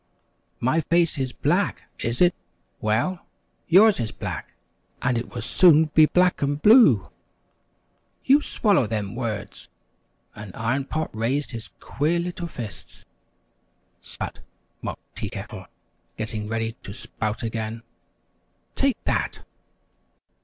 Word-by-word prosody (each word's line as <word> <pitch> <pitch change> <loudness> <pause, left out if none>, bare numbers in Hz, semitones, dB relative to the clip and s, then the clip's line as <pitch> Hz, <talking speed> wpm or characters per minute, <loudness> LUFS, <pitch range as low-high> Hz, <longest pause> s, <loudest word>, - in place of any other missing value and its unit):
"My 140 +7 +2
face 170 -3 +2
is 130 -1 -1
black, 175 +11 0
is 115 +5 -2
it? 175 -1 +6 0.5
Well, 120 +13 -1 0.4
yours 200 +2 +6
is 115 -2 -2
black, - - -6 0.4
and 125 -1 +1
it 115 +1 -3
will 120 - -6
soon 160 +2 +5
be 155 -1 +7
black 180 +2 +2
and 145 +1 0
blue!" 155 - +6 1.1
"You 280 +3 +6
swallow 200 - +2
them 105 -2 -3
words!" 115 -4 -5 0.6
and 105 -3 -10
Iron 130 +4 -1
Pot 155 -4 -3
raised 130 +7 -1
his 115 -3 -8
queer 155 +4 0
little 175 0 -3
fists. 120 -9 -9 1.0
"Sput!" - - -7 0.4
mocked - - -8
Tea - - -4
Kettle, - - -8 0.5
getting 110 -1 -4
ready 115 +1 -1
to 100 - -8
spout 110 +3 -4
again. 115 0 -4 0.9
"Take 275 -2 +2
that!" - - -1
130 Hz, 120 wpm, -24 LUFS, 110-170 Hz, 1.1 s, be